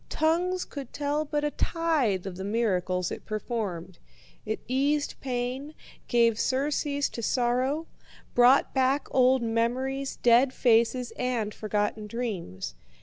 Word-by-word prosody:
Tongues 355 +4 +1
could 275 -4 -8
tell 295 +1 -1
but 295 0 -2
a 295 - 0
tithe 295 - 0
of 190 -2 -5
the 190 - -6
miracles 185 -4 0
it - - -6
performed. 205 -6 -4 0.5
It 220 - -2
eased 285 +3 +1
pain, 260 +3 -3 0.3
gave 230 -2 +3
surcease 285 +1 0
to 235 - -6
sorrow, 255 +6 0 0.5
brought 245 +3 +5
back 265 +2 +2
old 255 -1 +4
memories, 255 +4 -1
dead 245 +2 +4
faces, 235 +1 +2
and 240 -4 -1
forgotten 210 0 -2
dreams. 190 - -4
245 Hz, 125 wpm, -27 LUFS, 220-280 Hz, 0.5 s, brought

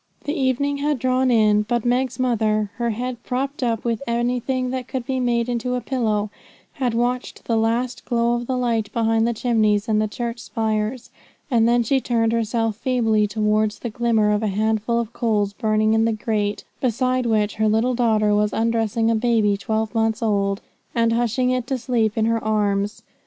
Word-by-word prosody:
The 290 - -2
evening 280 0 0
had 290 0 0
drawn 255 +1 +1
in, 215 -3 +4
but 235 +2 -1
Meg's 250 0 0
mother, 215 -4 +1
her 235 0 0
head 245 +2 -4
propped 275 +3 -3
up 230 -3 0
with 230 -2 -1
anything 250 +2 -1
that 255 -1 -4
could 255 -2 -4
be 260 0 -1
made 240 -1 +1
into 245 +1 -1
a - - 0
pillow, 215 -6 -1 0.4
had 250 -6 -1
watched 245 +1 -2
the 230 - 0
last 230 +3 0
glow 235 -1 +1
of 240 0 -2
the 260 - -1
light 230 -4 0
behind 225 0 +2
the 235 - 0
chimneys 215 -2 +1
and 215 -1 +2
the 215 - +1
church 235 +1 -4
spires, 220 +2 -2 0.4
and 230 -1 +4
then 240 0 +3
she 265 +4 +1
turned 225 -2 +1
herself 225 -1 0
feebly 225 -4 +1
towards 210 0 0
the 235 - -5
glimmer 225 -2 +2
of 210 0 +1
a 220 - 0
handful 220 +3 0
of 235 0 -4
coals 210 -3 0
burning 215 +1 +1
in 225 0 +3
the 230 - +1
grate, 210 -1 -2 0.2
beside 255 0 0
which 215 -2 +1
her 220 0 +2
little 225 +4 +2
daughter 220 -3 +2
was 210 0 +1
undressing 225 0 +1
a - - +2
baby 220 -3 +2
twelve 220 +2 -2
months 225 0 0
old, 200 -2 0 0.3
and 230 -1 +2
hushing 240 +2 +1
it 250 -1 -1
to 265 - -1
sleep 230 -3 0
in 220 - +2
her 230 0 0
arms. 205 -1 0
230 Hz, 190 wpm, -22 LUFS, 215-245 Hz, 0.4 s, in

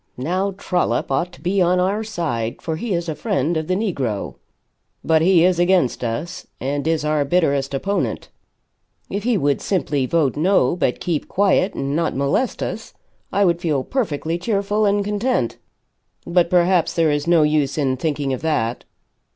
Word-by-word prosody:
Now 185 +9 -1
Trollop 175 -11 -1
ought 175 +7 0
to - - -15
be 190 +2 +1
on 180 +1 +3
our 195 +4 0
side, 150 - -3
for 160 - -3
he 220 +7 -4
is 170 0 -3
a 160 - -1
friend 150 +2 -1
of 160 -1 -2
the 185 - +1
negro. 140 - -2 0.7
But 160 -1 +3
he 175 0 +5
is 180 -1 +2
against 175 -9 +2
us, 120 +9 -4
and 140 +3 -2
is 160 -2 0
our 150 -1 +1
bitterest 140 -3 +1
opponent. 200 +9 -2 0.8
If 200 +2 -3
he 240 -3 +2
would 145 -4 +1
simply 150 -8 0
vote 155 -4 +1
No, 170 -3 +2
but 130 -8 0
keep 165 -4 -2
quiet 195 0 +2
and 140 +1 -2
not 165 0 0
molest 140 - 0
us, - - -6 0.4
I 200 0 +2
would 170 -1 +1
feel 150 -6 0
perfectly 165 - -2
cheerful 205 +1 0
and 200 0 +1
content. 210 - -1 0.7
But 170 0 +2
perhaps 175 -1 +2
there 165 -2 +3
is 145 +1 -1
no 170 -2 +5
use 150 -2 +1
in 135 -3 +1
thinking 145 -1 -2
of 130 - -4
that." 125 -7 -1
165 Hz, 175 wpm, -21 LUFS, 145-185 Hz, 0.8 s, he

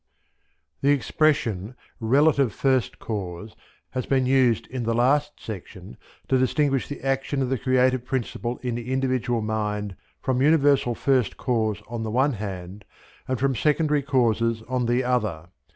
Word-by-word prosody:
The 140 - +2
expression 125 - +1 0.2
"relative 140 +2 +3
first 130 +1 +1
cause" 100 -1 -5 0.4
has 130 -1 -3
been 130 -2 +2
used 130 -3 +3
in 130 -1 -5
the 115 0 0
last 145 +5 +2
section 95 - -9 0.3
to 130 - +2
distinguish 135 +1 +1
the 145 - -7
action 135 +1 -1
of 125 - -2
the 130 -2 -1
creative 130 0 +2
principle 125 -1 -3
in 125 -1 -1
the 120 +2 -5
individual 130 -3 0
mind 105 -2 -2 0.2
from 130 -1 0
Universal 140 -4 +3
First 130 -5 +1
Cause 110 -4 -1
on 115 -1 -5
the 110 - -3
one 135 +5 +2
hand 100 -2 -6 0.4
and 130 -1 -1
from 135 -1 +1
secondary 150 +2 +2
causes 115 -4 +1
on 125 0 -1
the 120 +2 +2
other. 105 -10 -1
125 Hz, 150 wpm, -24 LUFS, 110-135 Hz, 0.4 s, relative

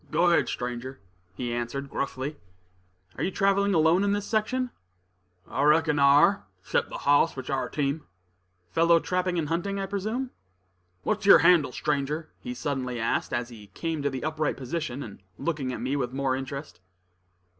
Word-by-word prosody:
"Go 175 +3 +3
ahead, 170 - +3
stranger," 125 +2 -4 0.4
he 120 +2 -3
answered, 120 +4 -3
gruffly. 140 +2 -3 0.8
"Are - - -1
you - - +1
traveling 200 0 +2
alone 165 +4 +4
in 200 0 +2
this 205 0 -1
section?" 245 +4 0 0.8
"I 135 - -2
reckon 150 0 +4
I - - +4
ar', 145 - +5 0.2
'cept - - 0
the - - -5
hoss 145 +3 +3
which 130 +1 -5
'ar 135 - 0
a - - -15
team." 145 +1 -2 0.6
"Follow 170 0 +5
trapping 180 +1 -1
and 160 -3 0
hunting, 180 +5 -1
I 195 - -1
presume?" 215 +7 -3 0.7
"What's 210 -1 -1
yer - - +10
handle, 170 -6 +5
stranger?" 150 +3 -2
he 250 -1 -6
suddenly 130 - -3
asked, 115 - 0
as 120 0 -2
he 110 -4 -12
came 165 -2 -2
to 140 - +1
the 130 -2 -5
upright 155 -1 -1
position, 140 0 -4
and 100 -4 -10 0.2
looking 150 -6 -2
at - - -5
me 130 +3 -1
with 125 -3 -2
more 135 -1 0
interest. 135 - -6
150 Hz, 175 wpm, -27 LUFS, 130-180 Hz, 0.8 s, yer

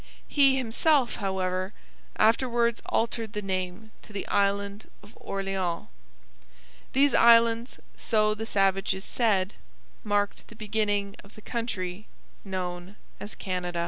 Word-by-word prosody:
He 275 -2 +5
himself, 260 +2 +2
however, 185 -1 -2 0.4
afterwards 235 +1 +2
altered 225 -1 -1
the 210 - -3
name 185 +3 -3
to - - -15
the 200 - -5
Island 200 +1 0
of 205 - -16
Orleans. 195 -3 -3 1.0
These 280 +2 +4
islands, 230 +1 +5 0.2
so 215 -2 +2
the 220 +1 -5
savages 195 -1 +1
said, 205 -5 +1 0.5
marked 205 -2 -1
the 230 - -14
beginning 205 -2 -1
of 200 - -17
the 215 - -12
country 210 -5 -4 0.4
known 185 -1 -5 0.2
as 205 - -7
Canada. 180 -2 -3
205 Hz, 115 wpm, -27 LUFS, 190-230 Hz, 1.0 s, He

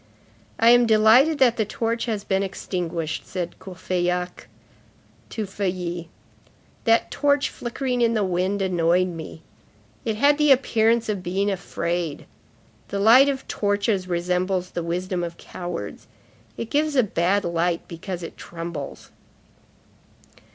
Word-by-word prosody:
"I 230 +1 +6
am 245 -1 +6
delighted 225 +8 +5
that 250 -4 +4
the 220 - +2
torch 230 +1 -2
has 215 -3 -2
been 195 -1 0
extinguished," 175 -4 -3
said 175 -2 -5
Courfeyrac 180 -1 -3 0.8
to 220 - -3
Feuilly. 180 -3 -3 0.8
"That 230 -1 +3
torch 285 -1 +1
flickering 250 +1 -3
in 230 -1 +3
the 215 - +2
wind 190 +2 0
annoyed 180 0 +2
me. 165 -1 -8 0.6
It 220 -2 -1
had 285 +6 +3
the 300 -1 +5
appearance 230 -3 +3
of 205 -3 -2
being 195 +3 0
afraid. 175 -4 -3 0.6
The 200 - -4
light 245 +7 +7
of 270 -1 -3
torches 205 -2 0
resembles 180 +1 -1
the 175 - -3
wisdom 175 +2 -2
of 170 0 -5
cowards; 175 - -7 0.5
it 230 - -5
gives 300 0 +1
a 255 - +5
bad 195 0 +1
light 170 0 -1
because 175 +1 -6
it 165 - -7
trembles." 165 -3 -7
190 Hz, 130 wpm, -23 LUFS, 175-230 Hz, 0.8 s, light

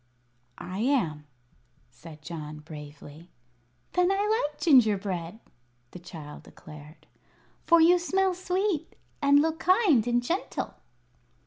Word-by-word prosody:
"I 185 +2 -7
am," 185 - 0 0.6
said 150 +5 -14
John, 155 -1 -8
bravely. 150 +1 -12 0.6
"Then 360 +1 +2
I 420 +3 +1
like 295 - -25
gingerbread," 205 - +2 0.5
the - - -10
child 160 -4 -10
declared; 150 +1 -14 0.6
"for 335 -1 +6
you 350 +2 +5
smell 380 +2 +1
sweet 365 -2 -2 0.3
and 285 +1 +5
look 320 0 -2
kind 360 - +3
and 240 0 +1
gentle." 345 +10 -3
240 Hz, 110 wpm, -27 LUFS, -, 0.6 s, for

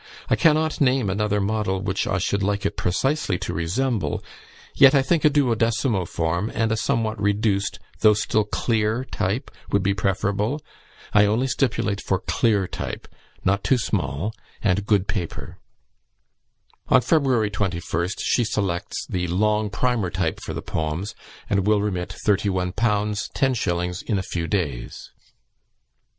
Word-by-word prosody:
I - - +6
cannot 155 -2 +2
name 130 -6 +3
another 105 +1 0
model 100 -1 0
which 95 0 -1
I - - +1
should 100 +2 0
like 100 0 0
it 105 - -1
precisely 100 - 0
to - - -4
resemble, 105 +7 -1 0.5
yet, 135 +1 +7
I 135 - +4
think, 165 +3 +1
a 150 - +7
duodecimo 115 - +1
form, 85 +7 -1
and 110 -1 +1
a - - +2
somewhat 110 -3 -1
reduced, 100 -1 +1 0.2
though 105 -1 +6
still 105 +1 +1
clear 110 +3 0
type, 110 +4 -2 0.2
would 100 -1 +2
be 100 0 +2
preferable. 100 +6 0 0.5
I 105 0 +6
only 110 +5 +1
stipulate 115 -6 0
for 95 - 0
clear 105 0 +1
type, - - -5 0.4
not 100 +2 +2
too 130 - +3
small, 95 - -2 0.3
and 95 +2 +1
good 100 -3 +2
paper." 90 -6 -4 1.3
On 130 - +5
February 125 -6 +2
21st 90 -1 -2
she 120 - +2
selects 95 -5 -2
the 90 -1 -2
"long 105 +4 +1
primer 115 -3 0
type" 85 -2 -1
for - - -6
the - - -5
poems, 80 +7 -3 0.3
and 100 -1 +1
will 105 -1 +4
remit 95 -4 -2
31_l_. 95 -3 +1
10_s_. 105 -3 0
in 105 - 0
a 95 - -1
few 85 -3 -3
days. 75 - -3
105 Hz, 145 wpm, -23 LUFS, 95-115 Hz, 1.3 s, yet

